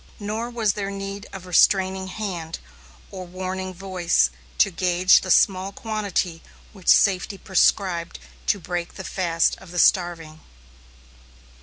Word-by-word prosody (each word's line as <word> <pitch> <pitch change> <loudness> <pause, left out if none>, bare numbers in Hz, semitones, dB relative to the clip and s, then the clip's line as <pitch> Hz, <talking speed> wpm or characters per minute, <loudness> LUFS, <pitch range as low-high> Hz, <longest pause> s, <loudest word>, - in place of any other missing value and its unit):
Nor 215 +3 -3
was 230 -4 0
there 200 -1 -4
need 195 0 -6
of 190 -1 -9
restraining 190 +1 +3
hand, 180 -5 -5 0.5
or 185 -2 -7
warning 185 +1 -5
voice 180 - 0 0.3
to - - +4
gauge 180 +1 +4
the 185 - -6
small 190 +1 +3
quantity 200 -6 -3 0.3
which 190 -4 -16
safety 195 0 +4
prescribed 185 -2 +1 0.3
to - - +3
break 175 0 -5
the 190 - -7
fast 170 -4 0
of - - -14
the 175 - -8
starving. 170 -4 +2
185 Hz, 130 wpm, -23 LUFS, 175-195 Hz, 0.5 s, to